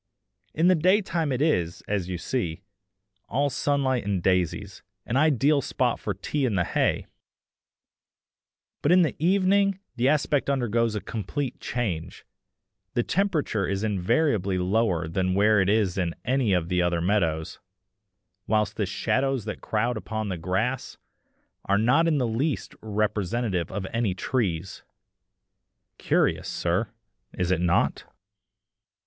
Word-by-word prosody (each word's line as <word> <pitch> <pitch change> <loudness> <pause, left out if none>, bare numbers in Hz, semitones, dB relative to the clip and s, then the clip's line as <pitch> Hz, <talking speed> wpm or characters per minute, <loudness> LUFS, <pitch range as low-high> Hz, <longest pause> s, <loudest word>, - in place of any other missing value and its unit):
In 165 +3 +3
the 185 - +6
day 185 +5 +4
time 165 -5 -1
it 130 +2 +1
is, 90 - 0
as 100 -3 -1
you 90 - -2
see, 90 -4 -3 0.7
all 140 +1 +1
sunlight 135 -3 0
and 100 -3 -1
daisies, 95 +1 0 0.2
an 120 - -2
ideal 145 0 +3
spot 125 -2 0
for 105 - -3
tea 140 +9 -2
in 120 -6 +1
the 90 - +2
hay; - - 0 1.8
but 145 - +2
in 180 0 +6
the 160 - -1
evening 195 +2 +3 0.2
the 125 +3 +3
aspect 145 -1 +1
undergoes 115 -4 +1
a 105 - -2
complete 120 - -4
change. 90 -9 -4 0.7
The 120 - +2
temperature 160 - 0
is 100 +1 -2
invariably 105 - +1
lower 90 -3 +1
there 90 +4 -1
than 95 +1 0
it 105 -2 +4
is 100 -3 +1
in 85 -2 -1
any 130 -4 +1
of 90 -3 +1
the 90 0 +1
other 85 -1 +1
meadows, 85 -4 0 0.9
whilst 105 -1 +1
the 105 -3 0
shadows 135 +5 0
that - - -5
crowd 115 +2 -1
upon 110 0 -4
the 95 - -3
grass 95 +10 -2 0.7
are 100 - +2
not 130 +10 +3
in 160 -3 +2
the 130 - +1
least 130 +6 -2
representative 105 -3 -1
of 100 -2 -4
any 115 -5 0
trees! 95 -6 -2 1.2
Curious, - - +1
sir, - - 0 0.5
is 90 0 -1
it 95 - +1
not?" 85 -1 +1
110 Hz, 140 wpm, -26 LUFS, 95-135 Hz, 1.8 s, the